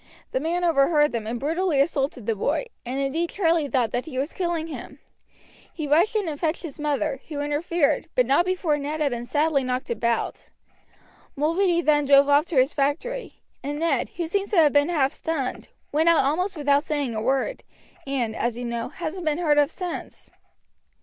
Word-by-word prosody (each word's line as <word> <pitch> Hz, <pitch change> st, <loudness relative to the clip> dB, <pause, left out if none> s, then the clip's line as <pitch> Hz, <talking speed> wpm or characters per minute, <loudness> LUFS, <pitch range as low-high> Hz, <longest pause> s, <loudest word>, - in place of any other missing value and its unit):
The -, -, 0 dB
man 340 Hz, +5 st, -1 dB
overheard 295 Hz, -2 st, +3 dB
them, 230 Hz, -2 st, -3 dB
and 235 Hz, +1 st, -3 dB
brutally 320 Hz, +2 st, 0 dB
assaulted 275 Hz, -5 st, 0 dB
the 225 Hz, -, +1 dB
boy, 205 Hz, -, -1 dB, 0.2 s
and 255 Hz, +3 st, -4 dB
indeed 310 Hz, +5 st, -1 dB
Charlie 330 Hz, -5 st, +1 dB
thought 250 Hz, -6 st, 0 dB
that 245 Hz, +5 st, -2 dB
he 270 Hz, -5 st, -6 dB
was 280 Hz, +4 st, -2 dB
killing 345 Hz, -3 st, -1 dB
him. 325 Hz, -, -8 dB, 0.7 s
He 310 Hz, -3 st, -5 dB
rushed 340 Hz, +10 st, +3 dB
in 415 Hz, -4 st, 0 dB
and 295 Hz, -2 st, -4 dB
fetched 325 Hz, +1 st, -1 dB
his 310 Hz, -4 st, -8 dB
mother, 295 Hz, -1 st, -1 dB
who 295 Hz, -3 st, -5 dB
interfered, 295 Hz, +2 st, 0 dB
but 250 Hz, -, +4 dB
not 275 Hz, +7 st, +3 dB
before 350 Hz, -5 st, 0 dB
Ned 295 Hz, +2 st, -3 dB
had 290 Hz, -3 st, +1 dB
been 240 Hz, 0 st, -4 dB
sadly 295 Hz, -1 st, +1 dB
knocked 255 Hz, -1 st, -2 dB
about. 235 Hz, +1 st, -2 dB, 0.9 s
Mulready 340 Hz, +4 st, +2 dB
then 295 Hz, -2 st, +3 dB
drove 280 Hz, 0 st, +6 dB
off 290 Hz, +3 st, +4 dB
to 335 Hz, -, -5 dB
his 260 Hz, +2 st, +4 dB
factory, 340 Hz, -, -2 dB, 0.2 s
and 290 Hz, +2 st, -4 dB
Ned, 310 Hz, -5 st, 0 dB
who 345 Hz, -, -1 dB
seems 395 Hz, +4 st, -1 dB
to 415 Hz, -, 0 dB
have 305 Hz, -4 st, +5 dB
been 290 Hz, +2 st, +4 dB
half 280 Hz, -6 st, +1 dB
stunned, 305 Hz, -6 st, -3 dB, 0.2 s
went 315 Hz, +3 st, +3 dB
out 330 Hz, -5 st, +4 dB
almost 360 Hz, +6 st, 0 dB
without 285 Hz, -1 st, +3 dB
saying 290 Hz, -5 st, -2 dB
a 215 Hz, -, -3 dB
word, 270 Hz, -, -1 dB, 0.4 s
and, 245 Hz, -5 st, -1 dB
as 235 Hz, 0 st, -1 dB
you 245 Hz, -, -4 dB
know, 235 Hz, -1 st, -3 dB
hasn't 340 Hz, +2 st, -5 dB
been 300 Hz, 0 st, +1 dB
heard 300 Hz, -4 st, +3 dB
of 290 Hz, -1 st, +3 dB
since. 360 Hz, 0 st, -7 dB
295 Hz, 195 wpm, -24 LUFS, 270-335 Hz, 0.9 s, drove